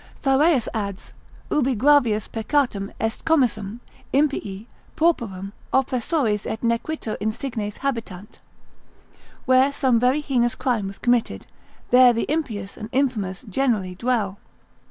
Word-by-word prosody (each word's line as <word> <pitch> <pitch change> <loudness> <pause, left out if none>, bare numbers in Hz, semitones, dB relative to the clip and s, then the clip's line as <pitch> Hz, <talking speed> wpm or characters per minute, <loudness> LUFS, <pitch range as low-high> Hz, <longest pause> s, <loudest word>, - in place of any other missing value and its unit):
Thyreus 275 -1 +3
adds, 200 -4 -5 0.4
ubi 270 -4 +2
gravius 240 -4 +3
peccatum 225 -4 -1
est 225 0 -2
commissum, 240 -8 +1 0.3
impii, 230 -8 0 0.3
pauperum 215 - 0 0.2
oppressores 255 -4 0
et 220 - -4
nequiter 235 +1 -1
insignes 215 -1 -3
habitant 225 -7 -4 1.1
(where 260 +2 +4
some 260 -4 +2
very 255 +5 +2
heinous 245 -5 +1
crime 230 -6 -1
was 195 - -8
committed, 245 -2 0 0.5
there 250 0 +7
the 230 - -1
impious 220 -11 -3
and 215 0 -7
infamous 235 -7 -1
generally 210 -4 0
dwell). 210 -1 -1
235 Hz, 115 wpm, -23 LUFS, 210-270 Hz, 1.1 s, there